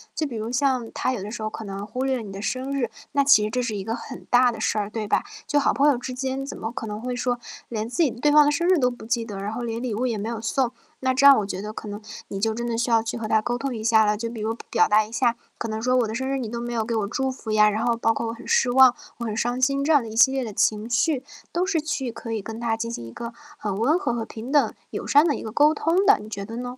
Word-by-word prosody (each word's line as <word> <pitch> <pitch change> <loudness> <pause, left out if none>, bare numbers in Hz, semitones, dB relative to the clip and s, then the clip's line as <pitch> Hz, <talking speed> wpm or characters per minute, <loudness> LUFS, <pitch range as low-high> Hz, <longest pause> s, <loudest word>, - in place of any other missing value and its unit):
就 315 - 0
比 255 -6 -5
如 220 +2 -4
像 255 -3 +1
他 - - 0
有 210 - -4
的 205 - -6
时 220 -1 -6
候 215 - -1
可 220 - -7
能 195 +1 -5
忽 250 +5 -4
略 260 -3 0
你 205 -3 -8
的 195 +1 -7
生 260 +4 -2
日， 255 -5 -1 0.2
那 280 0 +3
其 275 -7 +6
实 210 - -1
这 250 +3 -1
是 235 -3 -2
一 195 - -4
个 225 +2 -3
很 - - -9
大 245 0 +5
的 - - -7
事 215 - 0
儿， 205 0 -2
对 215 -1 -4
吧？ - - +2 0.2
就 290 - +3
好 280 - +2
朋 285 +1 +4
友 275 - +3
之 250 +1 -6
间 265 +1 -3
怎 - - -7
么 225 - -4
可 240 -3 -5
能 210 +1 -5
会 250 0 -3
说 245 0 -1 0.3
连 220 -1 -3
自 250 +8 -1
己 285 - +3
对 290 +6 +1
方 300 0 +7
的 295 - +3
生 340 +4 0
日 370 - +5
都 250 - +3
不 245 -2 -10
记 230 0 0
得， 200 -3 -6
然 205 +2 -3
后 240 - -4
连 230 0 -3
礼 240 -4 -2
物 250 +4 0
也 225 -3 -1
没 215 +3 -3
有 230 - -4
送。 240 +2 0 0.3
那 260 0 +1
这 280 +2 +6
样 275 - +9
我 210 - 0
觉 190 -1 -4
得 210 +1 -5
可 215 - -7
能 205 +1 -6 0.3
你 195 - -4
就 220 +2 0
真 235 0 -3
的 235 - -1
需 235 +2 0
要 225 -1 +4
去 230 +1 -3
和 220 - -3
他 220 - +3
沟 240 +3 -2
通 265 0 -3
一 220 - -5
下 220 -1 +5
了， 210 0 +1
就 230 +1 -4
比 225 -3 -7
如 225 +2 -2
表 225 - +4
达 210 0 +4
一 215 - -14
下 235 0 +2 0.2
可 230 - -3
能 220 0 -3
说： 250 +2 +1
“我 225 - 0
的 220 - -4
生 265 +2 -2
日 270 0 -1
你 235 -4 -4
都 235 +1 -4
没 240 0 -4
有 225 -2 0
给 230 0 -2
我 205 -2 0
祝 265 +4 -1
福” 240 -4 -6
呀， 210 0 +6
然 215 +3 -1
后 235 -1 +2
包 225 -1 +2
括 - - -2
“我 225 - -3
很 235 - -12
失 245 - +3
望， 260 -1 +7 0.2
我 235 - -3
很 215 -1 -3
伤 245 +2 -1
心”。 275 +1 +2
这 320 - +4
样 285 - +6
的 225 - -7
一 220 - -7
系 265 +3 +7
列 265 -1 -1
的 220 - -5
情 215 +2 +1
绪 265 +3 +1 0.3
都 350 +1 0
是 370 -4 +1
去 290 -5 -2
可 230 0 -8
以 220 -2 -2
跟 225 +2 -7
他 230 -1 0
进 230 +1 -4
行 120 - -6
一 115 - -9
个 235 - -6 0.3
很 200 -2 -3
温 295 +11 +2
和 385 - -1
和 235 -1 -2
平 230 +5 -8
等、 290 -2 +3 0.2
友 - - -5
善 290 +4 +5
的 290 - +1
一 - - -6
个 220 - -5
沟 295 +5 +5
通 335 +6 +2
的， 410 +1 +6
你 210 - -10
觉 200 -2 -5
得 225 +3 -7
呢？ 245 - -4
235 Hz, 355 characters per minute, -24 LUFS, 220-265 Hz, 0.3 s, 样